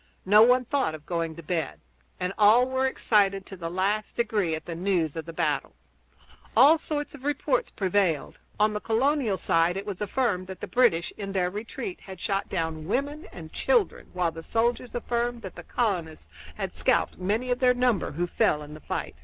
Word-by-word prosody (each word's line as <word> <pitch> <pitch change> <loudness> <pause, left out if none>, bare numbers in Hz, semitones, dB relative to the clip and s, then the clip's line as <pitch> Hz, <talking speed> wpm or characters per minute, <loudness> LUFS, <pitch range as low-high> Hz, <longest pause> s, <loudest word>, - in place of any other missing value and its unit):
No 210 +3 +7
one 250 +2 +5
thought 260 - 0
of 150 -1 -13
going 165 -2 -2
to 170 - -10
bed, 160 -3 -2 0.4
and 180 +1 -2
all 220 +4 +6
were 260 0 +1
excited 200 -6 +2
to 195 - -9
the 170 -2 -5
last 200 +4 -1
degree 210 -8 0
at 160 - -8
the 170 - -5
news 170 -3 0
of 160 -1 -5
the 165 - -7
battle. - - -1 0.8
All 310 +4 +7
sorts 295 -2 -4
of 280 -3 -12
reports 295 - 0
prevailed. 185 -5 0 0.2
On 210 0 +3
the 210 - -2
colonial 235 -1 +1
side 165 +1 +2
it 195 - -4
was 205 -2 -5
affirmed 210 -4 0
that 190 -1 -8
the - - -4
British, 235 -9 +2
in 195 -2 -5
their 180 -2 +1
retreat, 215 0 -6
had 190 -2 -10
shot 195 +1 -1
down 160 -3 -3
women 285 - -2
and 160 -2 -10
children; 480 -5 +1
while 180 -2 0
the 165 - -8
soldiers 235 +5 -1
affirmed 240 0 -2
that 190 - -7
the 175 - -8
colonists 175 - -2 0.3
had - - -4
scalped - - +1
many 215 +7 -1
of 245 - 0
their 250 -1 +4
number 245 -10 +1
who 175 +4 -1
fell 150 -3 +1
in 150 0 -10
the 155 - -10
fight. - - -4
200 Hz, 195 wpm, -27 LUFS, 170-245 Hz, 0.8 s, No